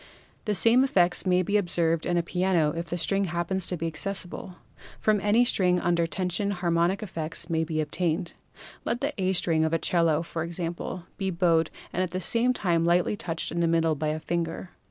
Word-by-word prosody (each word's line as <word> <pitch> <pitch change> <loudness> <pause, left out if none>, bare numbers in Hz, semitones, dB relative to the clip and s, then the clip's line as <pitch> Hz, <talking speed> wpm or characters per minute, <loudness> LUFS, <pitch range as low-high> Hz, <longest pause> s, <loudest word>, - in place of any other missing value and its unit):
The 210 -2 0
same 230 +6 +6
effects 180 -8 +2
may 180 0 +3
be 205 +4 +1
observed 170 -4 0
in 175 - +1
a 170 - +1
piano 180 -3 +1
if 170 +1 -4
the 175 - -3
string 195 +5 +1
happens 175 +2 -1
to 180 - -1
be 165 - -4
access 185 +5 -2
ible. 180 +1 -9 0.4
From 215 -2 +2
any 215 +4 +3
string 180 -6 +2
under 170 -1 +1
tension 185 +3 -1
harmonic 175 +1 0
effects 165 -2 -4
may 160 0 +1
be 155 0 -3
obtained. 165 +2 -2 0.5
Let 235 +1 -2
the 285 +2 -1
A 190 0 +1
string 165 -3 +2
of 160 0 0
a - - +4
'cello, 165 -2 +1
for 165 -1 -5
example, 170 +1 -4
be 195 -2 -1
bowed 170 -3 +2 0.2
and 180 - 0
at 185 - -1
the 185 +2 -3
same 230 +7 +2
time 175 -8 0
lightly 175 +4 +2
touched 170 -6 -3
in 170 - -2
the 170 - +2
middle 165 -1 +2
by 155 +1 -3
a 155 +1 -1
finger. 170 +2 -3
175 Hz, 205 wpm, -26 LUFS, 165-190 Hz, 0.5 s, same